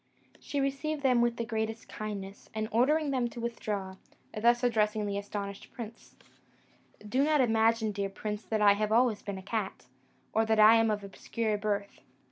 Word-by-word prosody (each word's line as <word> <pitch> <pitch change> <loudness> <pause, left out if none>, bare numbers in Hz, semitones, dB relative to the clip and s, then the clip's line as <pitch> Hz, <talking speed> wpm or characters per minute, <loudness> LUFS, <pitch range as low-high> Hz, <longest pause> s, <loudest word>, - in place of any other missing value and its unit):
She 285 - -3
received 280 +2 -2
them 250 -3 +4
with 240 0 +1
the 235 - -2
greatest 220 0 -3
kindness, 200 -2 -7
and 215 0 -1
ordering 285 +6 +2
them 255 -3 +1
to 235 - -9
withdraw, 205 -5 -4 0.4
thus 240 +3 +3
addressed 220 -3 +2
the 205 -2 -2
astonished 200 -1 -6
prince: 230 -1 -9 0.9
"Do 255 +6 +2
not 300 0 +3
imagine, 225 -2 +3
dear 200 -1 -2
prince, 210 +2 -5
that 215 -1 0
I 205 -1 +7
have 210 +1 -1
always 230 -1 +3
been 200 -2 -5
a 190 - -9
cat, 205 -1 -3 0.5
or 220 - +3
that 220 -1 +1
I 215 +2 +8
am 225 0 +3
of 210 -1 -1
obscure 215 +2 -2
birth. 205 -1 -2
220 Hz, 175 wpm, -30 LUFS, 205-240 Hz, 0.9 s, I